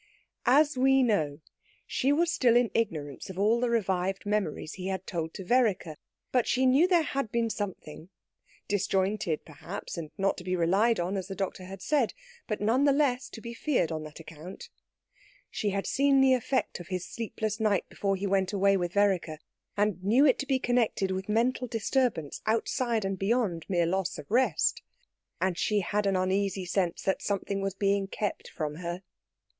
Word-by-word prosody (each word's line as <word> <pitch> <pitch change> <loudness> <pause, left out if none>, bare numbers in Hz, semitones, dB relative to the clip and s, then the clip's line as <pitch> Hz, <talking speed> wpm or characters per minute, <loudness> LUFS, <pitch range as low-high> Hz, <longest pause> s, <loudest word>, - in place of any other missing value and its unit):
As 290 +3 +5
we 270 0 +5
know, 155 - 0 0.4
she 270 +1 0
was 335 +3 +2
still 240 -3 +3
in 240 -1 +3
ignorance 155 -11 -2
of 190 - -8
all 215 +4 +3
the 245 0 +1
revived 195 -4 0
memories 200 -6 -1
he 185 -1 -6
had 190 -1 -3
told 165 -2 -3
to 190 - -6
Vereker; 205 -8 +1 0.4
but 250 -2 +2
she 260 +1 +2
knew 270 +7 +5
there 350 -3 +4
had 275 -6 -3
been 230 -1 0
something 185 -5 -6 0.6
disjointed, 195 -4 0
perhaps, 165 +5 -7
and 155 -2 -6
not 195 0 +1
to 180 - -8
be 185 0 -1
relied 195 +6 +2
on, 180 +3 -1
as 190 -1 -4
the 195 - -6
doctor 190 -1 -4
had 190 0 -9
said, 280 -7 +1 0.3
but 215 - -2
none 235 +7 +2
the 285 - +5
less 270 -3 +1
to 225 - -10
be 235 0 -7
feared 235 - 0
on 160 -1 -3
that 155 0 -10
account. 165 +3 -10 0.8
She 210 - -1
had 200 0 -2
seen 275 0 +3
the 265 -1 +5
effect 255 -2 -1
of 175 - -9
his 185 -2 -3
sleepless 220 -1 -4
night 210 -4 +1
before 195 -1 -1
he 195 +1 -4
went 195 0 +1
away 200 0 +3
with 175 -1 -2
Vereker, 190 -6 +1 0.4
and 200 -3 0
knew 235 +9 +4
it 265 - +4
to 275 - -3
be 270 -2 +2
connected 240 -6 +1
with 190 +2 -4
mental 245 +4 +1
disturbance 225 - -1
outside 225 0 0
and 195 -1 -2
beyond 195 -5 0
mere 175 -3 +2
loss 190 +2 -1
of - - -10
rest; 240 -7 +2 0.6
and 180 -1 0
she 210 -1 +1
had 205 +3 0
an 195 - +2
uneasy 190 0 0
sense 180 -1 -1
that 190 - 0
something 200 0 -2
was 195 0 -2
being 200 0 +1
kept 205 +1 -3
from 150 -2 -4
her. 175 +1 -5
200 Hz, 185 wpm, -29 LUFS, 185-235 Hz, 0.8 s, As